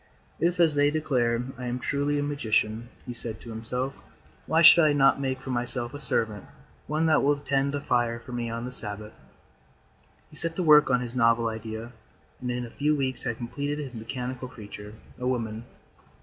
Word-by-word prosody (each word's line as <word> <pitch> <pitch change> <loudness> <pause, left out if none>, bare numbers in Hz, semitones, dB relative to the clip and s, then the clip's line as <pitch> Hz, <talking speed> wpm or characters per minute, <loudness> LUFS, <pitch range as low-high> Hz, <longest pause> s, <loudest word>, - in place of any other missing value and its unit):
] - - -34
"If, 175 +1 +1
as 165 -3 +5
they 145 0 +4
declare, 125 -6 +1 0.2
I 125 - -4
am 120 +1 -2
truly 145 +3 0
a 145 - 0
magician," 115 -5 0 0.2
he 125 - -5
said 115 -2 -6
to 115 - -9
himself, 125 +4 -3 0.5
"why 165 +1 +3
should 170 +1 +9
I 150 -1 +4
not 135 -1 +4
make 130 -1 -1
for 130 - -6
myself 120 0 -1
a 145 - -6
servant, 115 -6 0 0.4
one 155 +2 0
that 160 -1 +4
will 145 +1 +3
tend 140 0 0
the 145 0 -3
fire 120 -3 +1
for 120 - -12
me 120 -1 -3
on 115 +1 -4
the 125 - -5
Sabbath?" 105 -3 -7 1.2
He - - -14
set 165 0 -1
to 185 - -1
work 150 -3 +7
on 125 -1 +3
his 120 -1 -5
novel 115 -2 +3
idea 110 +1 -6 0.5
and 125 - -4
in 125 0 -2
a 115 - -11
few 150 +4 +1
weeks 130 -3 +2
had 115 - -2
completed 145 +5 -3
his 140 -4 -6
mechanical 125 +3 -5
creature, 105 -2 -10 0.2
a 125 - -2
woman. 115 -3 -2
125 Hz, 200 wpm, -27 LUFS, 115-145 Hz, 1.2 s, should